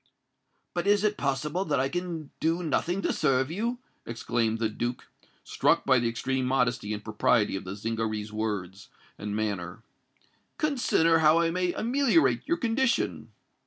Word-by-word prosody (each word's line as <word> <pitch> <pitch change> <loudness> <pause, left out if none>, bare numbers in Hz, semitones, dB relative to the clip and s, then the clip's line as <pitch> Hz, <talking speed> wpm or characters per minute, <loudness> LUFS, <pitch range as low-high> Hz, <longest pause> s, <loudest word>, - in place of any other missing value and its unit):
"But 175 +2 -2
is 205 0 +4
it 210 0 +2
possible 145 +6 -1
that 145 -5 0
I 135 - +2
can 170 -2 -4
do 165 +3 0
nothing 175 +4 0
to - - +1
serve 135 -1 +1
you?" 230 +7 -2 0.3
exclaimed 115 -1 -1
the 115 -1 0
Duke, 120 +3 -4 0.4
struck - - +1
by 130 -1 +5
the 120 -1 0
extreme 130 +3 -2
modesty 125 -5 0
and 105 -1 -4
propriety 105 0 +2
of 95 - -5
the 95 +2 -5
Zingaree's 110 0 -3
words 100 -3 -4 0.3
and 105 0 -4
manner. 100 -2 -3 0.7
"Consider 240 - +2
how 155 +1 +5
I 165 -1 +2
may 180 0 0
ameliorate 215 - +2
your 340 +3 +1
condition." 240 +1 0
135 Hz, 155 wpm, -28 LUFS, 110-175 Hz, 0.7 s, by